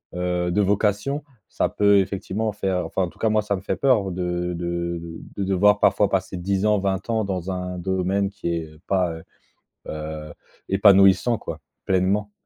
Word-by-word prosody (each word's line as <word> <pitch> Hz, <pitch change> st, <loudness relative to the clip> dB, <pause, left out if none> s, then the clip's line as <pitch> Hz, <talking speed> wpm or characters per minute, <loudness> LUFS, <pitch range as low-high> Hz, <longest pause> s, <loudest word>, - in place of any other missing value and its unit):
heu, 90 Hz, 0 st, -1 dB
de 105 Hz, -, +2 dB
vocation. 105 Hz, +8 st, 0 dB, 0.3 s
Ça -, -, 0 dB
peut 100 Hz, -1 st, +4 dB
effectivement 100 Hz, +3 st, -2 dB
faire, 95 Hz, -3 st, -1 dB
enfin 95 Hz, -, -2 dB
en 85 Hz, -, -2 dB
tout -, -, -21 dB
cas 110 Hz, -, +1 dB
moi 110 Hz, 0 st, +2 dB
ça 100 Hz, -1 st, -1 dB
me -, -, -8 dB
fait -, -, -2 dB
peur. 110 Hz, -9 st, +2 dB
De 90 Hz, 0 st, -2 dB
de 85 Hz, 0 st, -3 dB
de 80 Hz, -1 st, -8 dB, 0.2 s
de 100 Hz, -, -1 dB
devoir 100 Hz, +2 st, +3 dB
parfois 105 Hz, -2 st, +3 dB
passer 95 Hz, -1 st, -1 dB
10 95 Hz, +3 st, -1 dB
ans, 105 Hz, -1 st, +3 dB
20 95 Hz, +2 st, -2 dB
ans 110 Hz, -2 st, +1 dB
dans 95 Hz, -1 st, -3 dB
un 90 Hz, 0 st, -4 dB
domaine 95 Hz, +2 st, 0 dB
qui 90 Hz, -4 st, -3 dB
est, 80 Hz, -1 st, -3 dB
heu, 75 Hz, 0 st, -17 dB
pas, 90 Hz, -3 st, +1 dB
heu 80 Hz, 0 st, -9 dB, 0.7 s
heu, 75 Hz, 0 st, -6 dB, 0.4 s
épanouissant 100 Hz, +3 st, +5 dB
quoi, -, -, -7 dB, 0.3 s
pleinement. 95 Hz, +3 st, +1 dB
95 Hz, 190 wpm, -23 LUFS, 90-100 Hz, 0.7 s, épanouissant